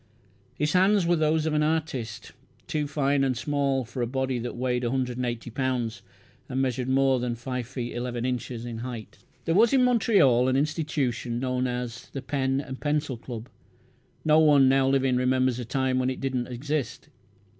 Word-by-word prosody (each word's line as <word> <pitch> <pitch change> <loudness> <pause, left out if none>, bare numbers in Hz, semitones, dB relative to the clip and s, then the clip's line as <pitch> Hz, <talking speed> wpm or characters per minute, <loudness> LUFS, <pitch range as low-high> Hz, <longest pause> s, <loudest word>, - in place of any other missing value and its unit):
His 150 +2 0
hands 190 +1 +4
were 175 +1 +3
the 155 -2 +2
hands 160 0 +1
of 160 - 0
an 150 - +2
artist 135 -9 -2 0.3
too 150 -2 -2
fine 140 -1 +1
and 130 -2 0
small 140 -1 0
for 125 +2 -5
a 120 - 0
body 130 0 -1
that 120 +1 -5
weighted 125 0 -1
180 125 -2 -2
pounds, 125 -3 -2 0.5
and 130 - -2
measured 130 -1 -1
more 135 -1 +3
than 120 -1 -2
five 125 0 -4
feet 125 -2 -5
eleven 120 0 -3
inches 125 -1 -3
in 115 -2 -5
height. 120 -2 -7 0.3
There 165 - +1
was 220 +7 +5
in 260 -2 +5
Montreal 195 - +4
an 130 - +1
institution 140 -5 -1
known 125 0 0
as 125 -1 -5
"The 135 - -5
Pen 135 -1 0
and 130 -2 -6
Pencil 150 -2 -1
Club". 120 0 -8 0.8
No 155 0 +5
one 145 -4 +6
now 135 0 +4
living 135 -2 +2
remembers 130 0 +1
a 125 - -4
time 130 +1 0
when 130 0 +1
it 130 - -4
did 135 -1 -2
not 125 0 -2
exist. 140 +3 -3
130 Hz, 185 wpm, -26 LUFS, 125-145 Hz, 0.8 s, one